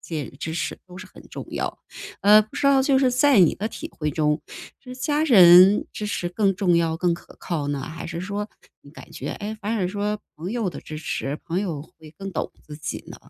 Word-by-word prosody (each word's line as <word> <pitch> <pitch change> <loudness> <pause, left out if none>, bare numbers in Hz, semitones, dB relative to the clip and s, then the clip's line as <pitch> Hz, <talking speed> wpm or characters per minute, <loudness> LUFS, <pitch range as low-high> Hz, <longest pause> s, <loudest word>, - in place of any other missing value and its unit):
亲 165 - -6
人 145 - -5
的 - - -17
支 160 +3 -5
持 170 - -3
都 180 -1 -13
是 185 +1 -10
很 - - -15
重 - - -7
要。 - - -3 0.4
呃， 210 +1 +7
不 215 0 -8
知 280 - +1
道 275 -1 +5
就 275 0 +3
是 260 -2 +3
在 255 -2 +4
你 170 - +5
的 210 - -3
体 225 - -7
会 150 -1 -3
中， 150 0 +1 0.4
是 250 -1 -10
家 295 +4 0
人 190 - +8
支 210 - -5
持 180 -3 -2
更 195 +2 +1
重 180 -2 +2
要、 165 -1 +1
更 175 +1 +1
可 170 - -14
靠 160 -5 -3
呢？ 145 -1 -2
还 160 +3 -7
是 165 0 -5
说 205 +3 -4 0.3
你 - - -15
感 - - -13
觉， - - -5
诶， 215 +1 -5
反 215 +2 -2
而 190 -4 0
说 205 +2 -2 0.2
朋 170 +5 -6
友 230 -3 -1
的 160 - -7
支 155 - -8
持 150 -1 -3
朋 175 +2 -1
友 170 -8 -3
会 160 0 -16
更 195 -1 -6
懂 - - -3
自 150 -1 -10
己 155 0 -6
呢？ - - -10
185 Hz, 255 characters per minute, -23 LUFS, 160-210 Hz, 0.4 s, 人